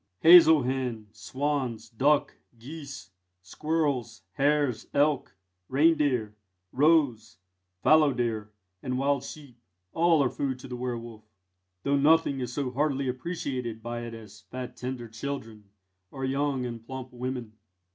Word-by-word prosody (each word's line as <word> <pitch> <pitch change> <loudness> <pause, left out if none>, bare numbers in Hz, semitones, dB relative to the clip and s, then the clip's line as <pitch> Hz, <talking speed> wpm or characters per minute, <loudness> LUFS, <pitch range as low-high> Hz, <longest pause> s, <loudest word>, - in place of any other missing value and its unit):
Hazel 160 -3 +8
hen, 125 -4 -3
swans, 125 0 -3
duck, 140 +6 +1 0.2
geese, 140 - -9 0.3
squirrels, 140 - -2
hares, 140 -1 +1
elk, 145 -8 +1 0.3
reindeer, 140 -6 +2 0.4
roes, 140 -7 +2 0.5
fallowdeer, 120 -9 +3 0.3
and 125 0 -2
wild 140 0 +1
sheep, 140 -4 -11 0.3
all 165 -3 +4
are 125 - +1
food 135 -2 -2
to 130 - -11
the 125 - -6
werwolf, 120 -3 -6 0.6
though 140 0 +2
nothing 145 -1 +3
is 125 -2 -3
so 130 -1 -2
heartily 140 0 0
appreciated 125 -5 -4
by 120 0 -4
it 115 -1 -7
as 110 -1 -12
fat 130 -1 -6
tender 125 -1 -5
children 115 -2 -6 0.4
or 135 +5 -5
young 135 -1 -1
and 115 -2 -6
plump 130 +1 -8
women. 125 -2 -5
130 Hz, 125 wpm, -28 LUFS, 120-145 Hz, 0.6 s, Hazel